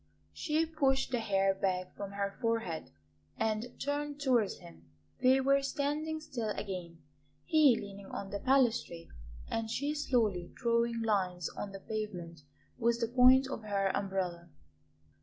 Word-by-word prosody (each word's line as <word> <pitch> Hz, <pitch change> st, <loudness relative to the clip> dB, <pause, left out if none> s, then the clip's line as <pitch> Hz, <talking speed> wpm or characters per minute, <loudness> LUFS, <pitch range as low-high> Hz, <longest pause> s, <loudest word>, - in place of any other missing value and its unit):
She 315 Hz, 0 st, 0 dB
pushed 270 Hz, -5 st, +1 dB
the 245 Hz, -, +1 dB
hair 195 Hz, -3 st, +2 dB
back 185 Hz, -1 st, -2 dB
from 200 Hz, -1 st, -6 dB
her 200 Hz, 0 st, -2 dB
forehead 225 Hz, -9 st, -1 dB, 0.5 s
and 220 Hz, +2 st, -2 dB
turned 290 Hz, 0 st, -2 dB
towards 245 Hz, -8 st, +2 dB
him. 80 Hz, -1 st, -15 dB, 0.3 s
They 260 Hz, +1 st, +5 dB
were 275 Hz, +1 st, +4 dB
standing 295 Hz, +3 st, -1 dB
still 260 Hz, -8 st, -4 dB
again, 175 Hz, -5 st, -6 dB, 0.4 s
he 295 Hz, -7 st, +5 dB
leaning 200 Hz, -1 st, -9 dB
on 195 Hz, 0 st, -6 dB
the 200 Hz, -, -3 dB
balustrade 240 Hz, -9 st, +1 dB, 0.4 s
and 225 Hz, -1 st, -2 dB
she 285 Hz, +6 st, -1 dB
slowly 225 Hz, -, 0 dB
drawing 235 Hz, -1 st, +1 dB
lines 185 Hz, -5 st, 0 dB
on 205 Hz, -, -6 dB
the 195 Hz, -, -8 dB
pavement 185 Hz, -7 st, -5 dB, 0.4 s
with 235 Hz, 0 st, +2 dB
the 230 Hz, -1 st, 0 dB
point 255 Hz, +2 st, +7 dB
of 265 Hz, -, -5 dB
her 200 Hz, -2 st, 0 dB
umbrella. 185 Hz, -3 st, -2 dB
225 Hz, 140 wpm, -32 LUFS, 195-265 Hz, 0.5 s, point